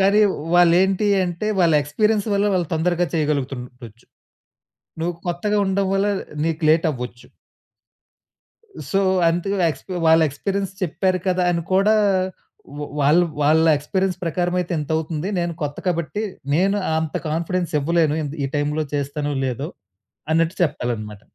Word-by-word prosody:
కానీ 200 +2 +4 0.3
వాళ్ళు 175 -1 +6
ఏంటీ 195 +2 +1 0.2
అంటే, 175 +5 -3
వాళ్ళ 165 -2 +4
ఎక్స్‌పీ‌రియన్స్ 210 +8 0
వల్ల 200 +1 +2
వాళ్ళు 175 -4 0
తొందరగా 175 +2 +1
చేయగలుగుతుండచ్చు. 130 -6 -3 0.9
నువు 175 +2 -1 0.2
కొత్తగా 205 +5 0
ఉండడం 190 0 0
వల్లా 200 +1 +2 0.3
నీకు 165 0 -2
లేట్ 160 +1 +3
అవ్వచ్చు. 125 -1 -8 1.6
సో, 195 - +2 0.3
అంతగా 175 +4 -1
ఎక్స్ 135 - -9 0.2
వాళ్ళ 160 0 +6
ఎక్స్‌పిరియన్స్ 195 +6 -3
చెప్పారు 185 +2 0
కదా! 180 0 +1
అని 170 -1 -1
కూడా 195 +3 +4 0.8
వ్ - - -4 0.2
వాళ్ళు 155 +5 +4 0.2
వాళ్ళ 160 +2 +4
ఎక్స్‌పిరియన్స్ 185 +5 -1
ప్రకారం 175 +2 -1
అయితే 175 0 -4
ఇంత 150 +1 -5
అవుతుంది. 160 +2 -3
నేను 170 -1 -1
కొత్త 145 0 -3
కాబట్టి 175 +4 -1 0.3
నేను 195 +4 +2 0.2
అంత 160 -1 -3
కాన్ఫిడెన్స్ 170 +2 -2
ఇవ్వలేను 160 0 +2
ఇంత్ 145 +1 -5
ఈ - - +1
టైమ్‌లో 150 +1 0
చేస్తానో 145 +1 -2
లేదో! 135 +4 -3 0.6
అన్నట్టు 165 +3 +2
చెప్పాలి 140 -6 0
అన్నమాట. 105 -1 -8
165 Hz, 140 wpm, -21 LUFS, 150-185 Hz, 1.6 s, వాళ్ళు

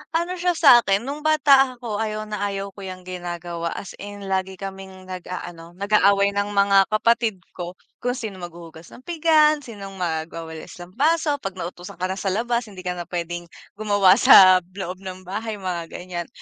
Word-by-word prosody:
Ano 350 +2 -1
siya 355 0 +1
sa'kin, 235 - +6
nung 280 +4 -5
bata 285 -4 +4
ako 230 -4 -5
ayaw 215 -1 -2
na 210 -1 -3
ayaw 200 0 -4
ko 200 - -16
'yang 185 -1 -8
ginagawa, 175 -2 -5
as 195 - -7
in 205 0 -8
lagi 190 0 -1
kaming 190 0 -9
nag-aano, 175 -2 -8
nag-aaway 200 0 +3
ng 200 0 -1
mga 200 -1 +4
kapatid 220 -3 +1
ko, 175 0 -7 0.2
kung 245 0 -1
sino 215 -6 -6
maghuhugas 170 -2 -10
ng 255 - -15
pinggan, 310 -2 +3
sinong 200 -7 -10
magwawalis, 160 -1 -5
lampaso, 295 - +1
'pag 195 -1 -5
nautusan 175 0 -7
ka 185 - 0
na 190 - -3
sa 195 0 -2
labas 235 +4 0
hindi 185 -2 -9
ka 180 - -1
na 175 - -5
puwedeng 175 0 -5 0.2
gumawa 205 -3 +4
sa 185 -4 +8
loob 185 +1 -7
ng 185 -1 -8
bahay, 215 +2 -4
mga 175 -3 -4
ganiyan. 175 -1 -6
195 Hz, 170 wpm, -23 LUFS, 180-220 Hz, 0.2 s, sa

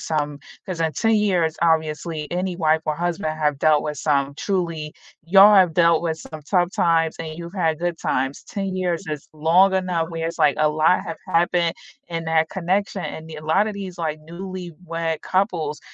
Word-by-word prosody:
some 150 -2 -2 0.3
'cause 180 -3 -5
in 160 -1 +1
10 225 0 +2
years, 180 -7 +1
obviously 160 -1 0
any 180 +1 -2
wife 160 -2 +2
or 155 - 0
husband 170 -1 -2
have 150 -2 0
dealt 150 0 +3
with 150 -1 -4
some 140 -2 +1
truly 170 -6 -2 0.3
y'all 195 +4 +7
have 185 -4 +5
dealt 170 -1 +4
with 160 -2 -2
some 155 -1 -9
tough 175 +2 +1
times 165 -2 +2
and 155 -1 -6
you've 170 0 -8
had 165 -5 0
good 175 -1 -2
times. 135 +2 -1
10 195 -2 -4
years 175 -3 -1
is 150 -2 -5
long 165 +5 +4
enough 180 -3 0
where 165 -1 -3
it's 165 - -5
like, 150 -2 +4
a 155 0 +4
lot 155 +4 +3
have 165 -3 -5
happened 170 0 +2 0.4
in 165 -1 -4
that 160 0 +2
connection, 190 +1 -1
and 160 0 -7
the 160 - -8
a 150 - -9
lot 190 +7 +3
of - - -4
these, 190 -3 -7
like, 155 -2 -2
newlywed 170 -1 -5
couples 175 -6 -1
165 Hz, 190 wpm, -22 LUFS, 155-180 Hz, 0.4 s, y'all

